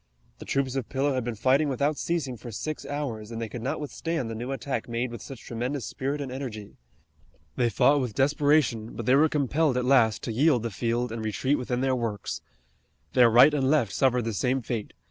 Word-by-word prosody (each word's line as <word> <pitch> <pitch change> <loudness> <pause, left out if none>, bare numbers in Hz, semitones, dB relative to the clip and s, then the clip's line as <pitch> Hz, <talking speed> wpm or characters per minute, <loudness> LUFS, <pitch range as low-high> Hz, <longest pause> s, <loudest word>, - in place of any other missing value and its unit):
The - - -9
troops 135 -1 -1
of 130 -4 -3
Pillow 140 +1 0
had 130 -2 -1
been 120 -1 -3
fighting 135 +7 +2
without 140 +3 0
ceasing 145 -6 -2
for 120 +1 -9
six 155 +8 -5
hours, 130 -7 -4
and 115 -1 -6
they 115 - -3
could 115 +2 -7
not 130 +4 -2
withstand 150 -3 -3
the - - -3
new 120 +4 -5
attack 135 -3 -3
made 120 +1 -2
with 120 -3 -7
such 135 -4 -9
tremendous 125 +3 -3
spirit 140 +2 -3
and 135 -2 -5
energy. 120 -6 -7 0.8
They 120 -1 +2
fought 140 +6 +3
with 120 -5 -4
desperation, 140 -5 +2
but 115 - -5
they 125 - +4
were 155 +3 +5
compelled 150 -1 +1
at 125 - 0
last 120 -5 +3
to - - -3
yield 130 0 +3
the 115 - -3
field 120 +5 -1
and 115 -1 -4
retreat 130 +6 0
within 125 0 -2
their 130 -1 +2
works. 115 -5 -3 0.7
Their 125 -2 +6
right 125 +6 +7
and 135 -3 +1
left 135 -9 +2
suffered 125 -3 +2
the 115 - -2
same 125 +5 0
fate. 110 -2 -4
125 Hz, 215 wpm, -27 LUFS, 115-140 Hz, 0.8 s, right